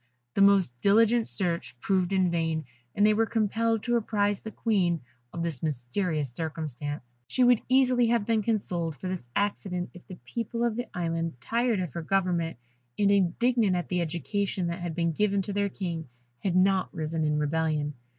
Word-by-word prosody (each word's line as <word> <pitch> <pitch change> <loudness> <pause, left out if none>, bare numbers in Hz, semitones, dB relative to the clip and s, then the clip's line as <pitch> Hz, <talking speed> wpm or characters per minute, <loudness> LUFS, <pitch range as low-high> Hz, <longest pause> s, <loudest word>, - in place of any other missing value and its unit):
The - - +1
most 195 -9 +5
diligent 225 +3 +4
search 170 - -3
proved 185 +3 +1
in 185 -2 +2
vain, 160 -2 -1 0.3
and 205 - +4
they 215 - +5
were 225 +1 +2
compelled 225 0 +1
to 240 -1 +2
apprise 205 -3 0
the 220 - -7
Queen 190 -7 +1 0.3
of 170 - -4
this 165 -6 -3
mysterious 150 0 -2
circumstance. 145 -4 -5
She 255 - +2
would 245 -2 +5
easily 255 -2 +4
have 230 -2 +2
been 225 -1 +2
consoled 180 -7 -1
for 150 - -6
this 180 -10 -5
accident 195 -3 -1
if 180 - -14
the 185 -2 -9
people 235 0 -3
of 235 -2 +1
the 245 +1 -3
Island, 165 -4 -2
tired 235 - 0
of 175 -8 -4
her 170 - -3
government, 175 -3 0 0.4
and 200 -1 +3
indignant 200 +2 +2
at 175 -7 -3
the 180 - +1
education 180 +3 -1
that 170 +2 -4
had 175 -2 -4
been 170 -1 +1
given 200 +3 +1
to 200 - -4
their 200 0 +1
King, 170 -7 -4 0.3
had 185 -3 -1
not 190 0 +3
risen 160 -1 -2
in 150 0 +1
rebellion. 150 -1 0
185 Hz, 180 wpm, -28 LUFS, 165-210 Hz, 0.4 s, most